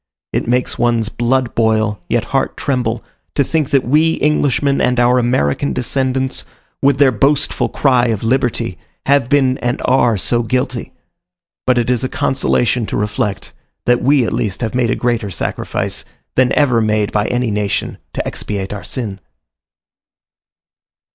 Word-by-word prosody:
It - - -1
makes 125 +1 0
one's 115 -2 +1
blood 125 +1 0
boil, 110 -3 +1
yet 120 -1 +1
heart 135 -1 0
tremble, 125 -4 -1 0.3
to 140 - +3
think 155 0 -1
that 135 -2 +2
we 155 +4 +3
Englishmen 145 -2 +1
and 125 0 +2
our 125 +1 +4
American 120 - +1
descendants, 130 +1 -1 0.4
with 140 -1 +3
their 140 -2 +5
boastful 135 +6 +1
cry 125 -3 +2
of 110 -3 -1
liberty, 125 +1 0 0.3
have 140 -3 +3
been 135 -2 +2
and 120 0 -1
are 125 -4 +3
so 120 +5 0
guilty: 130 +1 -2 0.8
but 125 -1 +4
it 120 +1 +1
is 125 0 +1
a 130 - -1
consolation 125 -4 +1
to - - -2
reflect, 105 0 -2 0.3
that 120 0 +3
we 135 -2 +3
at - - -2
least 110 -4 -2
have 115 -2 -2
made 125 -2 +1
a - - +1
greater 120 -4 -1
sacrifice, 90 - -3 0.3
than 130 0 +3
ever 130 -6 +3
made 110 -1 +1
by 105 0 0
any 125 -2 0
nation, 105 -1 -2
to - - -3
expiate 100 -1 -4
our 100 -2 -6
sin. 105 -2 -4
125 Hz, 155 wpm, -17 LUFS, 110-130 Hz, 0.8 s, their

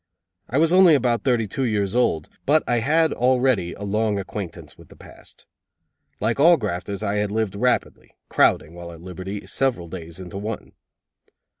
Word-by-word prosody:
I 130 - -1
was 165 +3 +3
only 185 -4 +7
about 120 -3 +1
thirty 120 -4 +2
two 105 +6 -5
years 105 -3 0
old, 80 -11 +1 0.2
but 155 +2 +4
I 120 -1 +2
had 160 +6 +2
already 125 -8 +1
a 105 - -9
long 105 +1 0
acquaintance 95 -2 -7
with - - -17
the - - -15
past. - - -13 0.7
Like 115 +5 -1
all 170 +4 +7
grafters 100 - -4
I 100 0 -1
had 105 0 0
lived 110 -2 -1
rapidly, 125 +5 -1
crowding, 80 - +2
while 85 0 -9
at 85 -1 -12
liberty, 95 +3 -7
several 125 -11 -1
days 85 0 -8
into 95 +1 -7
one. 105 +1 -6
105 Hz, 170 wpm, -23 LUFS, 95-125 Hz, 0.7 s, only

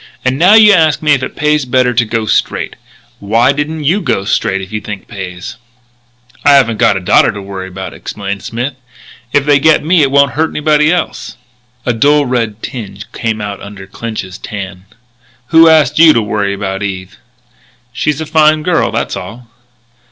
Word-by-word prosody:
And 130 +1 0
now 185 +5 +6
you 215 -2 +7
ask 160 -4 +2
me 150 -1 +4
if 135 - 0
it 130 - -5
pays 150 0 +1
better 125 -1 +1
to 120 0 +1
go 110 0 -2
straight. - - -1 0.4
Why 115 +6 +2
didn't 150 +2 -3
you 175 +9 +1
go 95 - -1
straight 95 -1 0
if 95 +1 -9
you 105 0 -4
think 105 -2 -7
it - - -30
pays?" 90 -2 -8 0.9
"I 145 -1 +6
haven't 115 -5 +3
got 115 -5 +3
a - - -2
daughter 90 - +3
to 105 - -8
worry 95 -1 -7
about," 95 0 -8
explained 100 -1 -6
Smith. 120 +4 -4 0.6
"If 145 -1 +1
they 145 -1 +4
get 155 +1 +3
me 170 0 +3
it 140 - +3
won't 140 0 +3
hurt 160 +1 0
anybody 150 0 +2
else." 180 - -3 0.5
A 120 - +1
dull 145 +5 +3
red 115 -4 -2
tinge 100 -5 -8
came 115 -2 -3
out 100 -1 -6
under 100 -1 -10
Clinch's 95 -2 -7
tan: 95 -3 -8 0.6
"Who 165 0 +6
asked 150 -2 +3
you 160 -1 +7
to 115 - +1
worry 100 -1 -2
about 95 0 -4
Eve?" 95 -1 -5 0.8
"She's 150 +5 -1
a 160 - -4
fine 155 0 +3
girl: 175 0 +1
that's - - -2
all." 115 +6 -9
120 Hz, 190 wpm, -13 LUFS, 100-150 Hz, 0.9 s, you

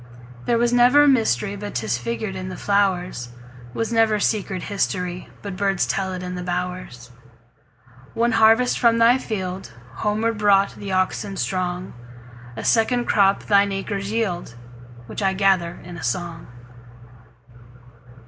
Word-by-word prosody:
There 235 - +3
was 240 +1 +1
never 250 +4 +6
mysteryBut 205 - 0
'tis 120 -1 -1
figured 120 - -4
in 185 0 -5
the 185 - -7
flowers; 185 -10 0 0.5
SWas 225 +1 -2
never 225 -2 +3
secret 195 -3 -1
historyBut 185 0 -3
birds 195 -1 +1
tell 190 -1 -2
it 185 -1 -5
in 180 0 -5
the 180 - -5
bowers. 180 -9 -5 1.0
One 235 +1 +2
harvest 225 +3 +4
from 230 -2 +4
thy 235 +3 +5
fieldHomeward 200 - -3
brought 200 -1 +3
the 200 -1 -7
oxen 190 +1 -1
strong;A 120 - -6
second 240 +2 +2
crop 195 -1 +3
thine 200 -1 +3
acres 195 +1 -3
yield, 185 - -2 0.5
Which 110 -2 -6
I 195 -1 +2
gather 190 -3 +1
in 175 0 -9
a 155 - -8
song. 165 +7 -3
195 Hz, 130 wpm, -22 LUFS, 175-215 Hz, 1.0 s, never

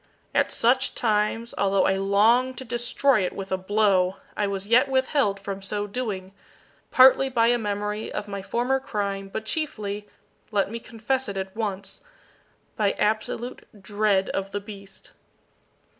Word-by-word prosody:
At - - +2
such 260 +3 +2
times, 220 +1 0
although 195 -1 +3
I - - +3
longed 220 +7 +3
to 260 - -6
destroy 240 0 +1
it 180 - -2
with 195 -1 -7
a 190 - +1
blow, 190 -2 +2 0.2
I 205 - 0
was 195 -1 -3
yet 240 +6 +4
withheld 260 -6 +1
from 195 0 -5
so 205 +1 -3
doing, 200 -4 -4 0.6
partly 265 +1 +6
by 230 -2 +3
a 240 0 +3
memory 210 0 -3
of 210 - -4
my 200 -1 -5
former 245 +6 0
crime, 200 -5 -3
but 220 - -4
chiefly 210 -8 -3 0.4
let 200 -2 0
me 230 - -4
confess 245 +2 -2
it 200 - -5
at 190 +1 -5
once 200 -3 -4 0.7
by 205 -2 +1
absolute 220 +3 -2
dread 205 0 +1
of 195 0 -2
the 205 - -3
beast. 200 -1 -11
210 Hz, 155 wpm, -25 LUFS, 195-240 Hz, 0.7 s, partly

